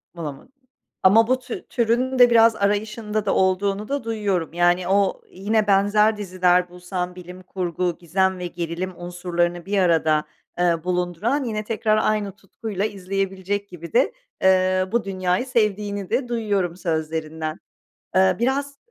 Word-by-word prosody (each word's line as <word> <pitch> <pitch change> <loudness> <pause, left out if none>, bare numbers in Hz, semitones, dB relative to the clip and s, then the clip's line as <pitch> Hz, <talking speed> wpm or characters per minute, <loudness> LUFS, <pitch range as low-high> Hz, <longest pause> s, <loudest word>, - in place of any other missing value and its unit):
Bulamadın 165 - -8 0.5
ama 220 +4 +6
bu 255 +1 +2
tü 250 -2 -7
türünün 250 +2 0
de 245 -1 +8
biraz 230 -1 +5
arayışında 210 +1 -1
da - - +1
olduğunu 195 +2 +1
da 280 -1 -2
duyuyorum 205 -8 -2
yani 175 +1 +2
o 195 0 +2
yine 210 +3 0
benzer 205 +2 +3
diziler 180 -2 +2
bulsan 180 0 -5
bilim 180 0 -10
kurgu, 180 -2 -2
gizem 190 +2 0
ve 180 - -3
gerilim 175 +2 -4
unsurlarını 175 0 -2
bir 200 +1 -1
arada, 160 -4 +3 0.3
eee, 170 -2 +2
bulunduran 180 - -1
yine 215 -3 -3
tekrar 215 0 +1
aynı 215 -2 0
tutkuyla 200 0 -5
izleyebilecek 195 0 -3
gibi 170 -2 -10
de, 250 +3 +3 0.3
eee, 185 0 +3
bu 235 0 +1
dünyayı 185 +2 -1
sevdiğini 210 -5 -1
de 245 +2 0
duyuyorum 205 -7 -1
sözlerinden. 160 -2 -3 0.6
Eee, 190 0 +4
biraz 275 +3 -1
190 Hz, 140 wpm, -23 LUFS, 180-215 Hz, 0.6 s, de